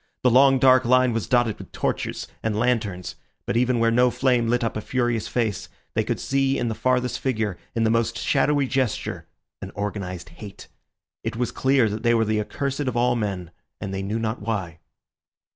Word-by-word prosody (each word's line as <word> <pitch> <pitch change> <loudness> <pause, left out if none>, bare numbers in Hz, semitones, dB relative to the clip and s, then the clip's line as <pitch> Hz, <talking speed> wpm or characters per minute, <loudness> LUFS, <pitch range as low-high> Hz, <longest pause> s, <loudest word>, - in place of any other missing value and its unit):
The 125 - +5
long 135 +2 +6
dark 130 -1 +5
line 125 0 +4
was 115 -2 -2
dotted 120 -4 +2
with - - -11
torches - - -2
and 110 -1 -1
lanterns; 110 -6 -1 0.3
but - - -2
even 125 +1 +2
where 115 0 +3
no 125 +2 +4
flame 125 -2 +1
lit 120 +1 +1
up 115 - -1
a 110 - -2
furious 120 -2 -1
face, 110 -7 -2 0.2
they - - +1
could - - -2
see 135 0 +1
in 120 - -1
the - - -1
farthest 125 +1 0
figure, 110 -8 -1 0.2
in 115 - +1
the 110 - +3
most 115 0 +1
shadowy 145 +2 +2
gesture, 130 -3 -2 0.3
an - - -6
organised 100 -3 -4
hate. 100 +4 -11 0.6
It - - -3
was 120 +1 -1
clear 130 -3 +3
that 105 +1 -4
they 120 0 +3
were 115 -1 +2
the 110 0 +1
accursed 135 +6 -3
of 130 -5 -1
all 125 +1 +3
men, 95 -6 -3 0.3
and 95 - -5
they 95 - -2
knew 100 +3 -2
not 115 0 -2
why. 95 -7 -3
115 Hz, 195 wpm, -24 LUFS, 105-125 Hz, 0.6 s, long